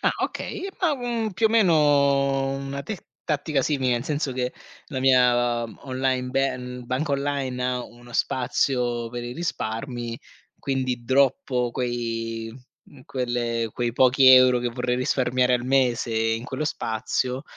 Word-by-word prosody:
Ah, - - +3
okay, 385 - -4
ma, 330 -5 +2
mhmm, 235 -4 -2
più 220 +5 +2
o - - +2
meno 215 -6 +4
ho 140 -2 +3
una 140 0 -5
tec 210 +1 -7 0.2
tattica 150 -1 0
simile, 130 -4 +1
nel 120 +1 -1
senso 145 -2 -2
che 125 0 -2 0.3
la 130 -4 -4
mia 120 -2 +3 0.2
online 130 -1 -1
ban 125 -2 -2
banca 140 +4 -1
online, 140 -3 -1
ha 125 -1 -1
uno 120 0 -15
spazio 120 -2 0
per 120 0 -5
i 120 - -5
risparmi. 120 -5 -4 0.4
Quindi 130 -3 -2
droppo 130 -1 +2
quei 115 -2 -3 0.3
mhmm, 135 - -17
quelle 120 -3 -2
quei 120 -1 -2
pochi 130 +1 +4
euro 130 -1 +7
che 120 - -1
vorrei 125 +1 -2
risparmiare 125 0 +1
al 120 -1 -1
mese, 125 -3 +1
in 115 +1 0
quello 135 +2 -3
spazio, 125 0 -2
130 Hz, 145 wpm, -24 LUFS, 120-140 Hz, 0.4 s, euro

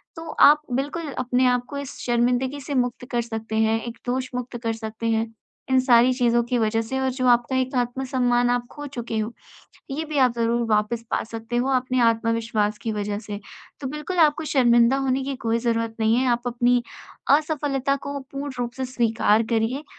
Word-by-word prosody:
तो 325 -1 -8 0.2
आप 300 +1 +4
बिल्कुल 290 +4 -2
अपने 255 0 +1
आप 250 0 +1
को 285 - -5
इस 280 -1 -6
शर्मिंदगी 250 +3 +1
से 280 +1 -4
मुक्त 250 -1 -1
कर 240 -1 +1
सकते 225 -1 -5
हैं, 220 0 +2
एक 235 0 -7
दोष 255 +1 -2
मुक्त 250 0 -4
कर 225 -1 -1
सकते 220 0 -5
हैं 225 0 0 0.4
इन 260 0 +4
सारी 245 -1 +5
चीज़ों 240 -2 +2
की 250 - +1
वजह 225 0 +1
से 265 +4 -3
और 265 0 +1
जो 255 0 -2
आपका 245 +1 +3
एक 260 +1 -1
आत्म-सम्मान 245 -1 +1
आप 245 0 0
खो 290 -1 -8
चुके 240 -4 -5
हो 215 +2 -3 0.6
ये 300 +4 -2
भी 305 -2 -3
आप 255 -3 +4
ज़रूर 235 +1 +1
वापस 215 +2 +1
पा - - 0
सकते 225 +1 -5
हो 245 +2 +1
अपने 255 0 0
आत्मविश्वास 225 -2 0
की 225 0 -3
वजह 205 -1 -2
से। 205 -1 -7 0.4
तो 275 - -4
बिल्कुल 300 +6 -5
आपको 300 +2 -2
शर्मिंदा 240 -1 +5
होने 270 -1 0
की 275 0 -3
कोई 225 +1 +2
ज़रूरत 230 -1 -1
नहीं 220 +1 +3
है 260 +1 +1
आप 240 0 -1
अपनी 245 0 +2 0.5
असफलता 285 -3 -1
को 280 0 -3
पूर्ण 275 +1 -6
रूप 240 -1 -2
से 265 - -2
स्वीकार 230 -3 +2
करिए 235 +6 0
245 Hz, 200 wpm, -23 LUFS, 230-265 Hz, 0.6 s, सारी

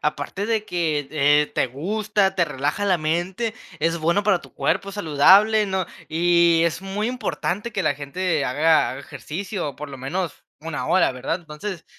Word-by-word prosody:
aparte 150 +7 -2
de 220 -2 0
que, 155 -7 -1
eh, 150 0 +4
te - - +1
gusta, 195 - -1
te 175 - +4
relaja 145 +6 -2
la 185 -3 +2
mente, 175 +8 -1 0.3
es 165 +2 +1
bueno 170 +5 +1
para 195 -4 +2
tu - - -16
cuerpo, 200 - -1
saludable, 205 +5 +5
¿no?, 190 -2 -1 0.2
y 170 0 +4
es 170 0 0
muy 200 +3 -2
importante 235 -3 -3
que 200 - -1
la 155 -4 +1
gente 155 +2 -1
haga 155 +5 +3
haga 130 - -7
ejercicio, 175 +2 -5
por 150 0 -8
lo 135 -1 -9
menos 155 +4 -4 0.2
una 160 0 -4
hora, 185 - +3
¿verdad? 130 +7 -3
Entonces, 165 +3 -7
170 Hz, 170 wpm, -23 LUFS, 150-195 Hz, 0.3 s, saludable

